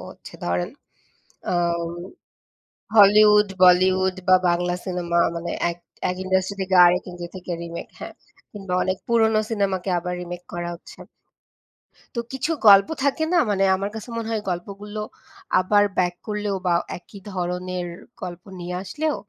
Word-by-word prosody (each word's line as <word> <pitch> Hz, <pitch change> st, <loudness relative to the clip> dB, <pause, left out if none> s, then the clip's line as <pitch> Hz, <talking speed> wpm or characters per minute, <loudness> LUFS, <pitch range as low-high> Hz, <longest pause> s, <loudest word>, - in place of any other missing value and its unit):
হচ্ছে -, -, -13 dB
ধরেন 90 Hz, 0 st, -1 dB, 0.8 s
আ -, -, +1 dB, 1.4 s
Hollywood, 210 Hz, 0 st, +7 dB
Bollywood 185 Hz, +1 st, +5 dB
বা 185 Hz, -, +8 dB
বাংলা 175 Hz, +1 st, +1 dB
সিনেমা 175 Hz, -2 st, -1 dB, 0.2 s
মানে 170 Hz, +1 st, -4 dB, 0.2 s
এক 170 Hz, -, -8 dB, 0.3 s
এক 180 Hz, -, -4 dB
industry 190 Hz, +1 st, 0 dB
থেকে 190 Hz, 0 st, -1 dB
আরেক 180 Hz, +1 st, +3 dB
industry 175 Hz, -1 st, -8 dB
থেকে 180 Hz, -1 st, -6 dB
remake, 170 Hz, 0 st, -7 dB
হ্যাঁ। -, -, -7 dB, 0.4 s
কিংবা 195 Hz, -3 st, -5 dB
অনেক 185 Hz, 0 st, -1 dB
পুরনো 220 Hz, -2 st, +3 dB
সিনেমাকে 195 Hz, -3 st, -1 dB
আবার 180 Hz, +1 st, -4 dB
remake 175 Hz, 0 st, -8 dB
করা 175 Hz, 0 st, -4 dB
হচ্ছে। 170 Hz, -, -14 dB, 1.2 s
তো 235 Hz, -, -2 dB
কিছু 270 Hz, +5 st, -2 dB, 0.2 s
গল্প 195 Hz, -1 st, +8 dB
থাকে 285 Hz, +3 st, +1 dB
না, 350 Hz, -, +5 dB
মানে 195 Hz, -1 st, +1 dB
আমার 195 Hz, +2 st, -3 dB
কাছে 220 Hz, +3 st, -7 dB
মনে 225 Hz, -1 st, -3 dB
হয় 220 Hz, -2 st, -1 dB
গল্পগুলো 200 Hz, +4 st, -5 dB, 0.6 s
আবার 205 Hz, +3 st, +3 dB
back 175 Hz, -1 st, +2 dB
করলেও 210 Hz, -1 st, -2 dB
বা 175 Hz, -, +3 dB, 0.2 s
একই 195 Hz, +3 st, -14 dB
ধরনের 180 Hz, 0 st, -3 dB, 0.3 s
গল্প 175 Hz, 0 st, -7 dB, 0.2 s
নিয়ে 175 Hz, +1 st, -5 dB
আসলেও 300 Hz, -, -2 dB
185 Hz, 145 wpm, -23 LUFS, 175-205 Hz, 1.4 s, বা